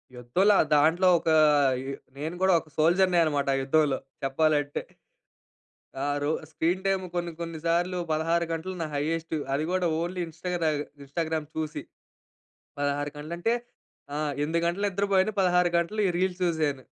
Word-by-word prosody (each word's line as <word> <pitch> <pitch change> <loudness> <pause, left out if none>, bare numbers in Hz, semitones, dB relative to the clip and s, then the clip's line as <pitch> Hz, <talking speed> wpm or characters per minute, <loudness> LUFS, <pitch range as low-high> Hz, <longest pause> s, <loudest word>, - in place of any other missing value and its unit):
యుద్ధంలో 180 - +2
ఆహ్, 155 - +3
దాంట్లో 160 +5 +4
ఒక 165 - -2 0.6
ఎ - - -2 0.3
నేను 160 +4 -4
గూడా 190 -1 +4
ఒక 155 - -16
సోల్జర్‌నే 175 +3 +3
అన్నమాట, 145 -3 0
ఆ - - +1
యుద్ధంలో 140 0 +2 0.3
చెప్పాలంటే. 145 +1 +1 1.2
ఆహ్, 145 0 0
రో 150 - +1 0.2
స్క్రీన్ 175 +4 0
టైమ్ 195 -1 +1
కొన్ని 175 -1 -2
కొన్ని 165 -1 -5
సార్లు 175 +2 +1
16 165 +2 +1
గంటలు 175 +3 -4
నా 160 - -2
హైయెస్ట్. 160 +2 -2 0.2
అది 150 +3 0
కూడా 185 -2 +1
ఓన్లీ 180 +1 -3
ఇంస్టాగ్రామ్ 165 -2 -2 0.2
ఇన్స్టాగ్రామ్ 155 +2 -3
చూసి 155 -1 -3 1.0
16 145 0 -1
గంటలు 155 +3 -6
అంటే 230 +6 +1 0.6
ఆహ్, 150 -1 -1
8 160 +3 0
గంటలు 190 +4 -1
నిద్రపోయాను. 200 +1 +1
16 180 -1 +3
గంటలు 205 +6 -1
ఈ - - +1
రీల్స్ 185 -1 0
చూసాను. 155 -6 0
165 Hz, 150 wpm, -27 LUFS, 150-180 Hz, 1.2 s, దాంట్లో